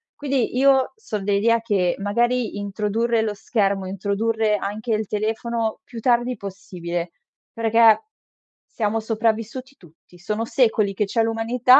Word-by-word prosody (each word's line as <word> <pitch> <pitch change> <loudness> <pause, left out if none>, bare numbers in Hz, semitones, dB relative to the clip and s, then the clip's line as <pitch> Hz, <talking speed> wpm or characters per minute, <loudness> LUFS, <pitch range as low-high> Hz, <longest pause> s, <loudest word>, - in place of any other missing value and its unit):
quindi 270 -4 -1
io 265 -1 +4
son 215 - -5
dell'idea 215 +3 +2
che, 195 -6 +1
magari, 235 +2 0
introdurre 210 +3 0
lo 210 -2 -2
schermo, 195 -3 0
introdurre 210 +3 0
anche 215 +4 -3
il 215 0 -2
telefono 220 +2 -2
più 235 -2 -9
tardi 240 +1 +2
possibile, 175 -3 -5 0.4
perché, 230 - +5 0.6
siamo 220 0 -1
sopravvissuti 225 +4 -2
tutti; 170 +1 -20
sono 215 +5 -3
secoli 220 -5 +2
che 210 - +1
c'è 225 +3 0
l'umanità 235 +4 +4
220 Hz, 125 wpm, -22 LUFS, 200-235 Hz, 0.6 s, perché